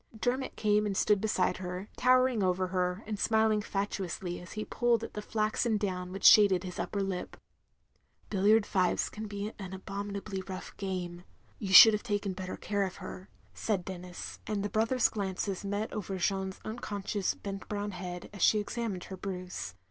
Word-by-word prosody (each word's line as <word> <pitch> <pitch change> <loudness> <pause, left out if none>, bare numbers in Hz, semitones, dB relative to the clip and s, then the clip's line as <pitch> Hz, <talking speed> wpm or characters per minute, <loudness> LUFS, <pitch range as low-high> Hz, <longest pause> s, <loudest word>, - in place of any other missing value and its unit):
" 220 - -13
Dermot 255 +3 -1
came 210 0 +2
and 195 -2 -2
stood 205 -2 +3
beside 210 -4 +1
her, 180 +1 -5
towering 255 -2 +4
over 185 0 +1
her, 180 +2 -1
and 210 -1 -4
smiling 220 -1 +3
fatuously 195 -3 -3
as 180 - -10
he 215 0 -4
pulled 235 -2 +1
at - - -6
the 210 - -4
flaxen 215 +1 0
down 180 -3 -3
which 195 +1 -7
shaded 200 -4 +8
his 180 -1 -6
upper 200 -2 -1
lip. 190 -2 -4 0.9
"Billiard 205 +2 +4
fives 185 -3 +1
can 215 0 -6
be 205 +1 -4
an 190 -2 -6
abominably 200 +1 -5
rough 185 -1 -7
game. 180 -3 -4 0.4
You 195 -3 -4
shotdd 220 +3 +12
have 210 -1 -1
taken 205 -4 -1
better 185 0 -5
care 205 -1 -1
of 190 -2 -3
her," 185 - -9 0.2
said 195 -5 -1
Denis, 180 -1 -7
and 205 -2 -1
the 205 - -1
brothers' 225 +4 +3
glances 195 -1 -3
met 205 +2 -2
over 195 -2 -3
Jeanne's 190 +1 -1
unconscious 205 -3 -2
bent 195 -1 -7
brown 205 0 -2
head 180 -1 -7
as 200 - -8
she 215 - +5
examined 210 -3 -3
her 190 - -8
bruise. 185 - -5
200 Hz, 180 wpm, -31 LUFS, 185-215 Hz, 0.9 s, shotdd